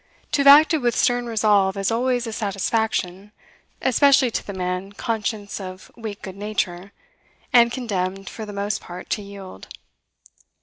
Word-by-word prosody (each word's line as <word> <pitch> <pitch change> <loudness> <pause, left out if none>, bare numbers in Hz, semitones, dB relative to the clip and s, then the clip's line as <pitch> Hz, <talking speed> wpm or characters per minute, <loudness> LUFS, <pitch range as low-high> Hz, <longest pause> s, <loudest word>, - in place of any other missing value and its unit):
To 295 - +1
have 280 - +3
acted 305 +2 +7
with 240 -1 +1
stern 245 0 +1
resolve 210 -3 +2
is 195 +2 0
always 245 +1 0
a 225 - -5
satisfaction, 205 -2 -2 0.5
especially 265 -1 +4
to - - -2
the - - -4
man 185 +1 -4
conscious 210 -1 -3
of 185 +1 -9
weak 220 -3 -7
good 190 -2 -7
nature, 200 -2 -3 0.6
and 235 -1 +6
condemned 195 -6 -3
for 220 - -7
the 210 - -7
most 200 +1 -2
part 180 +1 -10
to 210 - 0
yield. 200 - -10
210 Hz, 150 wpm, -22 LUFS, 195-235 Hz, 0.6 s, acted